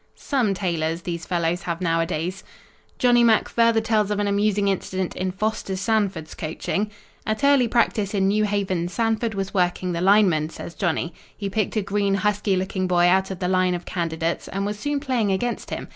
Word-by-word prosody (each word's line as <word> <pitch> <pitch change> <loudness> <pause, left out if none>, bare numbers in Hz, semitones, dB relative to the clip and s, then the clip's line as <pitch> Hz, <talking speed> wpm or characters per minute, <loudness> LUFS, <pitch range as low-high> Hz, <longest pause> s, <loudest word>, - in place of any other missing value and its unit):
"Some 245 -9 0
tailors, 170 -3 -2
these 170 -2 -5
fellows 175 0 0
have 170 -2 -3
nowadays." 165 +1 -1 0.5
Johnny 245 -1 +4
Mack 225 -2 +4
further 230 -1 +3
tells 215 -2 +1
of 210 - 0
an 205 - 0
amusing 205 0 +1
incident 190 -1 -2
in 185 0 -2
Foster 200 0 -2
Sanford's 195 -5 -1
coaching. 190 +6 -3 0.3
"At 215 +5 -2
early 280 -3 +5
practice 220 -3 +1
in 190 -1 +2
New 210 +2 +2
Haven 190 -4 -1
Sanford 225 +2 -1
was 195 0 -3
working 180 -1 0
the 170 0 -2
linemen," 185 -6 +4
says 170 - -8
Johnny. 170 -2 -1 0.2
"He 200 -2 -4
picked 215 0 -1
a 215 - +1
green, 200 0 0
husky 205 0 +1
looking 185 0 -1
boy 175 -1 +3
out 190 +2 +3
of 190 - -5
the 180 0 -2
line 185 -1 +2
of 175 - -6
candidates 165 -1 -2
and 195 +1 -3
was 205 0 -3
soon 290 +4 -1
playing 250 -7 0
against 235 +5 -2
him. - - -5
195 Hz, 190 wpm, -23 LUFS, 175-215 Hz, 0.5 s, early